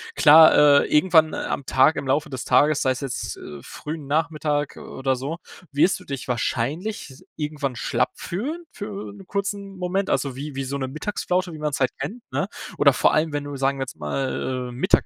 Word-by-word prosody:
Klar, 150 -2 +8
äh, - - -2
irgendwann, 160 -1 +5
äh, - - -3
am 140 - -3
Tag, 130 +5 +4
im 140 - -4
Laufe 150 +3 +1
des 130 -3 -5
Tages, 150 0 +4
sei 130 - +3
es 130 - -3
jetzt, 135 -3 -4
äh, 75 -1 -9
frühen 150 0 -7
Nachmittag, 150 -1 0
äh, - - -11
oder 135 0 -2
so, 140 +6 -4 0.3
wirst 145 +6 +3
du - - -15
dich 135 -3 -6
wahrscheinlich 135 - -2
s 130 - -15
irgendwann 150 -4 -3
schlapp - - 0
fühlen, 285 - -4
für 205 -1 -6
'n 200 -2 -13
kurzen 200 -1 -3
Moment. 185 +2 -1
Also 135 -3 0
wie 140 +1 -6
wie 135 - -2
so 135 +2 -3
'ne 130 -1 -3
Mittagsflaute, 180 +3 -2
wie - - -7
man's 150 -2 -2
halt 130 -1 +2
kennt, 240 +4 -5
ne? - - -1 0.3
Oder - - +6
vor - - +3
allem, 155 0 +1
wenn 145 0 -2
du, 145 0 -6
sagen 135 +1 +1
wir - - 0
jetzt 130 - -8
mal, 125 - -3
äh, - - -8
Mittag 135 +11 +2
150 Hz, 210 wpm, -23 LUFS, 135-170 Hz, 0.3 s, Klar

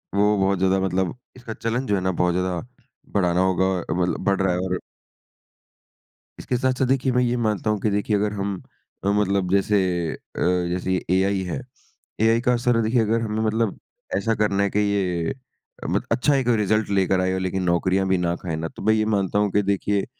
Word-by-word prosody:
वो 105 +1 +3
बहुत 95 0 +1
ज्यादा 95 +1 +2
मतलब 95 -2 -1 0.2
इसका 120 -3 -8
चलन 120 +4 -2
जो 100 - +2
है 95 - -1
ना 95 - 0
बहुत 90 0 +1
ज्यादा 90 -1 -1 0.5
बढ़ाना 90 -3 +2
होगा 95 0 +2
अ, 85 - -4
मतलब 90 +1 0
बढ़ 100 0 +1
रहा 95 -2 +2
है 90 - -1
और 90 0 -2 1.6
इसके 125 - -2
साथ-साथ 130 +1 +1
देखिए 130 0 +1
मैं 125 0 +2
ये 125 0 0
मानता 110 -1 0
हूँ 105 - 0
कि 110 - +1
देखिए 105 +1 0
अगर 105 +1 0
हम 100 -2 -3 0.4
अ, - - -1
मतलब 100 -2 +1
जैसे 100 +1 +3 0.4
अ - - -9 0.5
जैसे 90 +1 -2
ये 90 - -1 0.2
एआई 95 0 +1
है। 90 +7 -4 0.6
एआई 115 +1 +4
का 125 0 +2
असर 120 -1 +2
देखिए, 115 +2 +2
अगर 115 +1 +1
हमें 110 -1 -2
मतलब 110 -1 0 0.4
ऐसा 110 +3 0
करना 100 -1 +1
है 100 - +1
कि 105 - 0
ये 95 -5 0 0.6
मत - - 0
अच्छा 145 +3 +3
एक 130 -3 0
रिजल्ट 105 0 +1
लेकर 95 0 +2
आए 95 0 0
लेकिन 95 0 -2
नौकरियाँ 95 +2 +1
भी 95 0 +2
ना 85 -1 0
खाए 85 -2 -4
ना, 80 +1 -3
तो - - -12
मैं 110 +2 +4
ये 110 0 +1
मानता 100 0 0
हूँ 105 -1 +1
कि 105 - +3
देखिए 100 0 0
100 Hz, 205 wpm, -23 LUFS, 95-110 Hz, 1.6 s, एआई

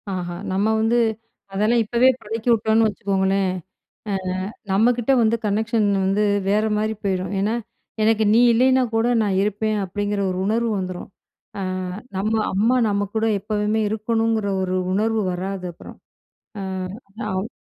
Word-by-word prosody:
ஆஹா! 180 -2 -3 0.2
நம்ம 195 +3 +1
வந்து, 225 +2 +2 0.5
அதெல்லாம் 215 +4 +2
இப்பவே 240 +4 +3
பழக்கிவிட்டோன்னு 225 0 +2
வச்சுக்கோங்களேன். 195 -2 0 0.6
ஆ - - 0 0.6
நம்மக்கிட்ட 235 +5 +2
வந்து 225 0 +3
கனெக்ஷன் 215 +1 +1 0.2
வந்து 195 +2 +2 0.2
வேறமாரி 215 +1 +1
போயிரும். 190 0 -1
ஏன்னா, 210 +4 0 0.5
எனக்கு 220 0 +3
நீ 225 - +5
இல்லயின்னா 260 +2 +4
கூட 225 +1 +2 0.2
நான் 195 -3 0
இருப்பேன், 210 +1 0
அப்பிடிங்கிற 205 +2 -2
ஒரு 180 - -4
உணர்வு 230 +2 +1
வந்துரும். 185 -1 -5 0.5
ஆ - - -3 0.6
நம்ம 210 +3 0 0.2
அம்மா 220 +6 +3
நம்ம 205 0 0
கூட 220 0 +1
எப்பவுமே 210 +1 -1
இருக்கணுங்கிற 225 0 0 0.2
ஒரு 185 0 -1 0.2
உணர்வு 220 +2 +1
வராது 185 +1 -4
அப்புறம். - - -12 0.6
ஆ, - - -4 0.7
ஆவ் 190 +2 -2
210 Hz, 130 wpm, -22 LUFS, 195-225 Hz, 0.7 s, நீ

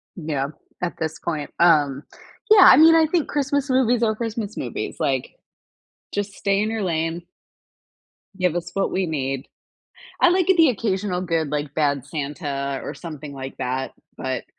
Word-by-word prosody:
Yeah, 150 -5 -2 0.3
at 180 -1 -3
this 160 -1 -3
point. 155 -4 -4
Um 150 -5 +4 0.5
yeah, 400 -4 +9
I - - +8
mean, 320 +2 +8
I 325 -1 +5
think 325 -1 0
Christmas 285 0 -1
movies 245 -2 +2
are 220 -1 +2
Christmas 220 -2 -4
movies. - - -5
Like, - - -1 0.8
just 205 0 -2
stay 200 0 0
in 215 - -1
your 225 -1 -2
lane 165 -2 -1 1.2
give 180 -2 +1
us 175 0 -4
what 195 - 0
we 190 0 0
need. 135 -4 -3 0.7
I - - +6
like 365 0 +2
a - - +6
the 320 -5 +6
occasional 195 -4 -1
good, 165 -4 -1
like, 150 -1 -3
Bad 145 -4 0
Santa, 140 -2 -4
or - - -6
something 150 -4 -8
like 135 -1 -7
that, 130 +1 -3 0.2
but 130 -2 -3
175 Hz, 165 wpm, -22 LUFS, 145-225 Hz, 1.2 s, yeah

